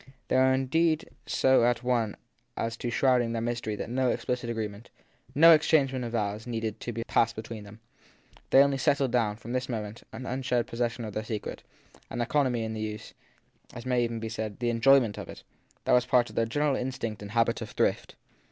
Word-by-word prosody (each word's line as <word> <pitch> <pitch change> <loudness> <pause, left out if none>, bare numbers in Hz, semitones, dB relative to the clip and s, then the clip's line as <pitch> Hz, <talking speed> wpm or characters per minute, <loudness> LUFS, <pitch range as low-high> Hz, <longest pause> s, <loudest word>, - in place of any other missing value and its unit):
They - - +1
were 130 0 +5
indeed 155 +5 +1 0.2
so 130 -2 +3
at 120 0 +1
one 120 -4 0 0.4
as 115 0 -2
to 120 - -3
shrouding 120 -1 +2
their 115 - -1
mystery 120 -2 -2
that - - -4
110 125 +2 +1
explicit 125 -1 -3
agreement, 110 -1 -5 0.5
no 165 +4 +8
exchange 150 -3 +3
of 125 -3 -3
vows, 105 0 -2
needed 115 -3 -3
to 120 - -5 0.2
pass 115 -1 +2
between 110 -1 -7
them; 105 +2 -13 0.7
they 135 - +7
only 140 -1 0
settled 140 -2 +2
down, 110 -4 +1
from 115 +2 -8
this 130 0 -2
moment, 110 -2 -4
to - - -17
an 130 - -7
unshared 125 -2 -1
possession 120 0 -3
of 105 - -6
their 110 - -3
secret, 110 -1 -5 0.5
an 120 - -5
economy 125 -1 +1
in 110 0 -3
the 110 - -4
use 110 0 -6 0.6
and, - - -11
as 120 - -8
may 125 -1 +2
even 115 -1 -2
be 115 - -4
said, 110 -2 -4
the 120 0 0
enjoyment 120 -2 +4
of - - -8
it, - - -10 0.4
that - - +3
was 125 0 +4
part 125 -2 +3
of - - -15
their 115 - +1
general 145 +3 +1
instinct 125 -5 -4
and 100 - -7
habit 115 -1 +2
of - - -5
thrift. - - -1
120 Hz, 205 wpm, -28 LUFS, 110-130 Hz, 0.7 s, no